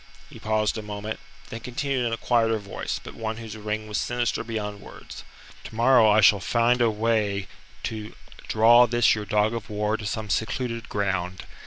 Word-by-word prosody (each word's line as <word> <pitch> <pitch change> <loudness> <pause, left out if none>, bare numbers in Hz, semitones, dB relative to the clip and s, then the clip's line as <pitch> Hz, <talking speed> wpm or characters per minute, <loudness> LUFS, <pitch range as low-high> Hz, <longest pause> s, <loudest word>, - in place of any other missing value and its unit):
He 120 - -11
paused 110 0 0
a - - -5
moment, 105 +1 -5 0.3
then 115 - -6
continued 125 +1 -2
in - - -2
a 115 - -1
quieter 115 -1 +2
voice, 100 -2 -5
but - - -9
one 110 -1 -4
whose 110 -2 -8
ring 110 0 -4
was 105 - -2
sinister 120 -1 -1
beyond 105 -3 -5
words: - - -11 0.4
"Tomorrow 115 0 +4
I 105 +1 +5
shall 100 0 +6
find 120 +4 +2
a 115 - +4
way 105 -3 0 0.4
to 110 -1 -5 0.3
draw 120 +2 +6
this 120 0 +4
your 105 -1 -3
dog 105 +2 +1
of 115 0 -5
war 105 +1 -1
to 105 - -5
some 110 -1 -3
secluded 115 +1 -2
ground. 95 -3 -2
110 Hz, 180 wpm, -25 LUFS, 105-115 Hz, 0.4 s, shall